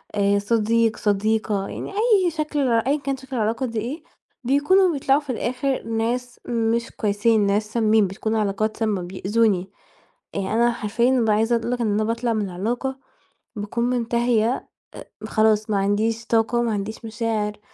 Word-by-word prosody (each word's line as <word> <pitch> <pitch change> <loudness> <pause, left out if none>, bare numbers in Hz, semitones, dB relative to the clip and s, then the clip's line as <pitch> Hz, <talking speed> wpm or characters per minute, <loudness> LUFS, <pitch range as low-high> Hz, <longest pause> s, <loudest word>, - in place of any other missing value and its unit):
آآ، 200 0 +2
صديق، 225 +1 +1
صديقة 210 -1 0
يعني، - - -6
أي 405 -4 +3
شكل 305 -1 -2
أًيًا 255 +6 +2
كان 275 -1 -3
شكل 265 0 -8
العلاقة 230 +3 0
دي 230 -2 -3
إيه، 260 +9 -5 0.4
بيكونوا 320 +8 +3
بيطلعوا 275 0 +2
في 285 - -19
الآخر 255 +3 -1
ناس 235 +2 -2
مش 230 0 0
كويسين، 210 0 +1
ناس 210 +2 0
سامِين، 220 -3 +3
بتكون 220 +4 -3
علاقات 215 +1 -1
سامّة، 215 -4 0
بيأذوني. 190 +1 0 0.6
يعني 200 +1 -2
أنا 235 +1 +3
حرفيًا 235 +3 0
بابقي 230 -5 +3
عايزة 225 +2 +2
أقول 230 +1 -3
لك 245 -1 -1
إن 215 -3 +1
أنا 215 +1 +1
باطلع 230 +1 -1
من 215 -2 -1
العلاقة، 240 +9 -3 0.6
باكون 210 +3 -3
منتهية، 240 -1 0 0.3
آآ، - - -9 0.2
خلاص، 215 -1 +2
ما 205 - +1
عنديش 215 +4 0
طاقة، 230 +1 +2
ما 235 -2 0
عنديش 210 +3 -5
مشاعر، 220 -2 -2
225 Hz, 160 wpm, -23 LUFS, 210-245 Hz, 0.6 s, أي